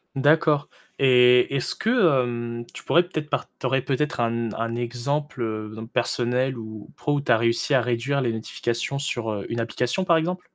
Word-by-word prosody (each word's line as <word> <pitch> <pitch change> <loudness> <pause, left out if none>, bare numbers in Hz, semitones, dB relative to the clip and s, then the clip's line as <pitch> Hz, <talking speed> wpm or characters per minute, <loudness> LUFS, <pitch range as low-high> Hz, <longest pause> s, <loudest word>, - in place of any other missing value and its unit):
D'accord 145 +1 +3 0.3
et 125 0 +5
est-ce 135 - 0
que, 225 - -2 0.3
hem, 120 -1 -4
tu - - -10
pourrais 170 - +4
peut-être 155 -4 -5
par - - -1
tu - - -6
aurais 135 +1 +2
peut-être 145 +2 -1
un 115 - +2
n 115 -1 -2
un 115 +1 -2
exemple, 125 +3 -3
heu, 110 -1 -3
donc 110 +1 -8
personnel 125 +1 0
ou 110 -2 -9
pro 145 -4 -1
où 140 - 0
tu - - -1
as 115 - +6
réussi 115 +5 +1
à 130 - +5
réduire 125 +4 -1
les 120 -3 0
notifications 115 +4 -3
sur, 120 -6 -2
heu, 100 -2 -4
une 115 - -3
application 125 +9 -1
par 170 -3 +4
exemple? 180 +3 -2
125 Hz, 200 wpm, -24 LUFS, 115-140 Hz, 0.3 s, as